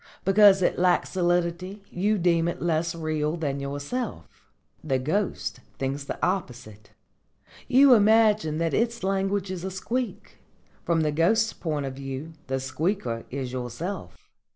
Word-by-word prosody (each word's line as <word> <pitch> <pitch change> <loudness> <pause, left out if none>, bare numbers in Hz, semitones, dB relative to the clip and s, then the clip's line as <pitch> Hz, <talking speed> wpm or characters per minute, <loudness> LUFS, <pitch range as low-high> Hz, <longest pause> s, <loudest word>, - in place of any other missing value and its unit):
Because 195 -1 +6
it - - +1
lacks 180 0 +2
solidity 175 +2 -1
you 205 +4 +1
deem 170 -2 +2
it 170 - -3
less 165 0 0
real 155 -1 -1
than 140 -4 -2
yourself. 145 - -4 0.6
The 135 -4 +1
ghost 175 +10 -2 0.2
thinks 135 +1 -3
the - - -5
opposite. 120 - -4 0.8
You 265 +1 +7
imagine 215 -7 +4
that 165 0 0
its 230 -1 0
language 195 0 0
is 180 -2 -5
a 190 - -2
squeak. 205 +3 -4 0.4
From 165 -1 +1
the 155 -1 +1
ghost's 220 +9 +2
point 150 -4 -3
of 135 - -4
view 135 +4 -6
the 135 0 -1
squeaker 130 - -2
is 130 -1 -4
yourself. 130 - -5
170 Hz, 140 wpm, -26 LUFS, 140-195 Hz, 0.8 s, You